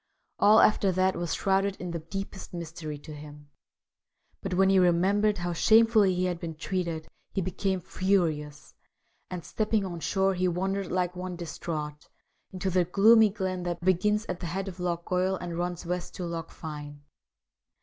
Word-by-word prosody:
All 215 Hz, +2 st, +7 dB
after 200 Hz, -2 st, +4 dB
that 185 Hz, +1 st, +2 dB
was 175 Hz, -1 st, -2 dB
shrouded 195 Hz, 0 st, +1 dB
in 180 Hz, -2 st, -6 dB
the 170 Hz, -, -3 dB
deepest 190 Hz, +3 st, -7 dB
mystery 165 Hz, -3 st, -6 dB
to 155 Hz, +2 st, -10 dB
him; 145 Hz, 0 st, -12 dB, 0.9 s
but -, -, -3 dB
when 190 Hz, +1 st, +4 dB
he 190 Hz, -, +5 dB
remembered 195 Hz, +4 st, +3 dB
how 175 Hz, -1 st, -2 dB
shamefully 220 Hz, 0 st, +5 dB
he 180 Hz, +1 st, 0 dB
had 175 Hz, -2 st, -2 dB
been 165 Hz, -2 st, -5 dB
treated 165 Hz, -1 st, -3 dB, 0.3 s
he -, -, 0 dB
became 190 Hz, +1 st, -1 dB
furious, 165 Hz, -6 st, -1 dB, 0.6 s
and 180 Hz, -2 st, -6 dB
stepping 215 Hz, -2 st, 0 dB
on 175 Hz, -2 st, -5 dB
shore 190 Hz, +6 st, +1 dB
he 185 Hz, 0 st, 0 dB
wandered 190 Hz, +2 st, -1 dB
like 180 Hz, -1 st, 0 dB
one 180 Hz, 0 st, -5 dB
distraught 155 Hz, -3 st, -5 dB, 0.4 s
into 190 Hz, 0 st, -2 dB
the 180 Hz, 0 st, +3 dB
gloomy 215 Hz, +5 st, +6 dB
glen 190 Hz, -3 st, -3 dB
that 175 Hz, -1 st, -3 dB
begins 210 Hz, +4 st, +2 dB
at 180 Hz, -3 st, -4 dB
the 175 Hz, -, -4 dB
head 190 Hz, +4 st, -3 dB
of 185 Hz, -1 st, -7 dB
Loch 170 Hz, -1 st, -2 dB
Goil 185 Hz, +1 st, +1 dB
and 175 Hz, -2 st, -5 dB
runs 175 Hz, 0 st, -3 dB
west 180 Hz, 0 st, -4 dB
to 180 Hz, -, -4 dB
Loch 165 Hz, -1 st, -5 dB
Fyne. 145 Hz, -2 st, -8 dB
180 Hz, 170 wpm, -28 LUFS, 170-195 Hz, 0.9 s, All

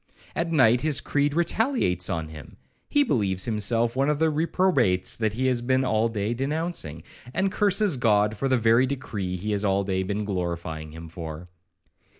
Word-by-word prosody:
At 170 Hz, 0 st, -1 dB
night 125 Hz, -6 st, +4 dB
his 155 Hz, -1 st, +1 dB
creed 145 Hz, 0 st, 0 dB
retaliates 170 Hz, -, +1 dB
on 80 Hz, -3 st, -3 dB
him; 75 Hz, -2 st, -12 dB, 0.3 s
he 290 Hz, -, +4 dB
believes 100 Hz, -, 0 dB
himself 115 Hz, +2 st, 0 dB
one 135 Hz, +2 st, +1 dB
of 150 Hz, -, +1 dB
the 160 Hz, +1 st, +2 dB
reprobates 150 Hz, -, +1 dB
he 110 Hz, +3 st, -1 dB
has 125 Hz, -2 st, +1 dB
been 130 Hz, +2 st, +1 dB
all 110 Hz, -1 st, +2 dB
day 110 Hz, 0 st, -2 dB
denouncing, 135 Hz, -, -3 dB, 0.3 s
and 195 Hz, 0 st, +1 dB
curses 200 Hz, -5 st, +2 dB
God 105 Hz, -2 st, +2 dB
for 135 Hz, -, -1 dB
the 130 Hz, -1 st, +3 dB
very 115 Hz, +3 st, +4 dB
decree 105 Hz, -9 st, -4 dB
he 105 Hz, +4 st, -4 dB
has 105 Hz, 0 st, 0 dB
all 100 Hz, -1 st, +1 dB
day 95 Hz, -1 st, -1 dB
been 100 Hz, +2 st, -2 dB
glorifying 85 Hz, -5 st, -4 dB
Him 80 Hz, +1 st, -9 dB
for. 80 Hz, 0 st, -7 dB
115 Hz, 170 wpm, -25 LUFS, 95-145 Hz, 0.3 s, night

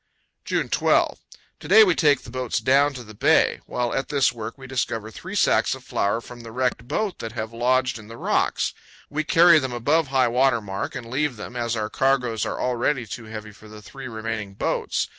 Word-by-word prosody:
June -, -, -1 dB
12. -, -, +2 dB, 0.4 s
To -, -, -10 dB
day 440 Hz, -, +8 dB
we 370 Hz, -4 st, +4 dB
take 145 Hz, -4 st, +3 dB
the 120 Hz, -, -11 dB
boats 130 Hz, -3 st, -2 dB
down 140 Hz, +5 st, +3 dB
to 125 Hz, -, -7 dB
the 110 Hz, -1 st, -12 dB
bay. 105 Hz, -, +3 dB
While 120 Hz, -1 st, -2 dB
at 135 Hz, -, -2 dB
this 140 Hz, -3 st, +2 dB
work 115 Hz, +1 st, -7 dB
we 135 Hz, -, -11 dB
discover 115 Hz, -4 st, -3 dB
three -, -, -8 dB
sacks -, -, +3 dB
of -, -, -13 dB
flour 100 Hz, +3 st, -1 dB
from 120 Hz, 0 st, -11 dB
the 115 Hz, -1 st, -10 dB
wrecked 125 Hz, -1 st, -1 dB
boat 195 Hz, +8 st, -2 dB
that 115 Hz, 0 st, -6 dB
have 110 Hz, -1 st, -5 dB
lodged 130 Hz, +1 st, +1 dB
in 105 Hz, -, -13 dB
the 115 Hz, +1 st, -10 dB
rocks. -, -, 0 dB, 0.4 s
We 155 Hz, +2 st, -1 dB
carry 165 Hz, +1 st, +6 dB
them 130 Hz, -3 st, -4 dB
above 145 Hz, +7 st, +1 dB
high 130 Hz, -2 st, +2 dB
water 125 Hz, 0 st, +3 dB
mark 100 Hz, +2 st, -5 dB
and 125 Hz, -3 st, -6 dB
leave 145 Hz, 0 st, 0 dB
them, 110 Hz, +3 st, -8 dB
as 120 Hz, -1 st, -1 dB
our 110 Hz, -1 st, -3 dB
cargoes 125 Hz, -5 st, +1 dB
are -, -, -4 dB
already 125 Hz, +1 st, 0 dB
too 110 Hz, +2 st, -7 dB
heavy 110 Hz, -1 st, -8 dB
for 110 Hz, +1 st, -16 dB
the 105 Hz, 0 st, -12 dB
three 135 Hz, +3 st, -9 dB
remaining 110 Hz, -3 st, -5 dB
boats. -, -, -1 dB
120 Hz, 215 wpm, -24 LUFS, 110-135 Hz, 0.4 s, day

